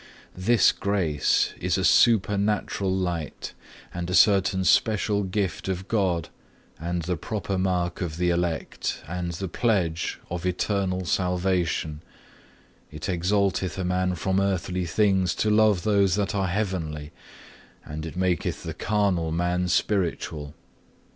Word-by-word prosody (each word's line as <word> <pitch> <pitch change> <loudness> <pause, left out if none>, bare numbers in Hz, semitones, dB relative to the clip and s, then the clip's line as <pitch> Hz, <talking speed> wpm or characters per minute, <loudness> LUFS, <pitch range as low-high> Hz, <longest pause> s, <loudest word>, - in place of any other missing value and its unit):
18. 90 - -9
This 115 -2 +5
Grace 90 -8 +1
is 90 +1 0
a 95 - 0
supernatural 105 -3 +3
light, 90 -4 -3 0.4
and 85 0 -4
a 90 - 0
certain 95 -2 +4
special 105 +1 +2
gift 95 -4 -2
of 95 0 -3
God, 90 -6 0 0.5
and 85 +1 -2
the 90 +2 -1
proper 100 +4 -3
mark 90 -2 -1
of 85 -3 -3
the 90 0 +2
elect, 85 -2 -2
and 85 +1 -3
the 95 +3 -4
pledge 90 -5 0
of 90 0 -3
eternal 95 0 -1
salvation; 90 -4 0 0.9
it 75 0 -7
exalteth 95 +1 0
a 95 - -2
man 90 0 0
from 95 +3 0
earthly 90 -2 -1
things 95 0 +2
to 105 - +1
love 105 -4 +4
those 100 -4 +3
that 100 -2 -1
are 100 -2 0
heavenly; 85 -7 -3 0.7
and 75 +1 -6
it 80 +1 -7
maketh 90 -3 -1
the - - -5
carnal 100 -6 0
man 90 +2 0
spiritual. 85 -6 -1
90 Hz, 135 wpm, -25 LUFS, 85-100 Hz, 0.9 s, This